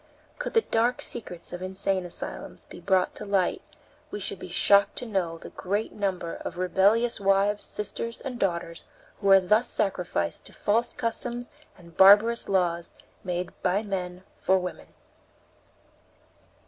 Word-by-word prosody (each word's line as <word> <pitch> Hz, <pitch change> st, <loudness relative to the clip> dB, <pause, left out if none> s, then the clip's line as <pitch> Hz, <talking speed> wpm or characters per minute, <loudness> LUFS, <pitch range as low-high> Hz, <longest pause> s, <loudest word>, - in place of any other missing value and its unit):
Could -, -, -4 dB
the 455 Hz, -, +6 dB
dark 235 Hz, +2 st, +1 dB
secrets 180 Hz, -7 st, -4 dB
of 175 Hz, -, -6 dB
insane 190 Hz, 0 st, -2 dB
asylums 175 Hz, -, -7 dB
be -, -, -12 dB
brought 185 Hz, -1 st, +1 dB
to -, -, -8 dB
light 200 Hz, -3 st, 0 dB, 0.5 s
we -, -, -5 dB
should -, -, -2 dB
be -, -, -8 dB
shocked 200 Hz, 0 st, +5 dB
to -, -, -4 dB
know 185 Hz, -7 st, -2 dB
the -, -, -11 dB
great 205 Hz, +4 st, -2 dB
number 190 Hz, -5 st, -3 dB
of 175 Hz, -, -7 dB
rebellious 200 Hz, +6 st, +2 dB
wives, 200 Hz, +1 st, +2 dB
sisters, 230 Hz, +2 st, -4 dB
and 255 Hz, -3 st, -6 dB
daughters 170 Hz, -3 st, -2 dB, 0.3 s
who 200 Hz, -, -1 dB
are 195 Hz, 0 st, +9 dB
thus 210 Hz, +6 st, +3 dB
sacrificed 175 Hz, -, -1 dB
to -, -, -15 dB
false 230 Hz, +3 st, +1 dB
customs 240 Hz, +2 st, -4 dB, 0.3 s
and 170 Hz, -2 st, -17 dB
barbarous 210 Hz, +4 st, +6 dB
laws 175 Hz, -3 st, 0 dB, 0.3 s
made 180 Hz, 0 st, -3 dB
by 190 Hz, +3 st, +1 dB
men 185 Hz, -3 st, -4 dB
for 190 Hz, -, +2 dB
women. 180 Hz, -1 st, -5 dB
195 Hz, 150 wpm, -26 LUFS, 180-215 Hz, 0.5 s, are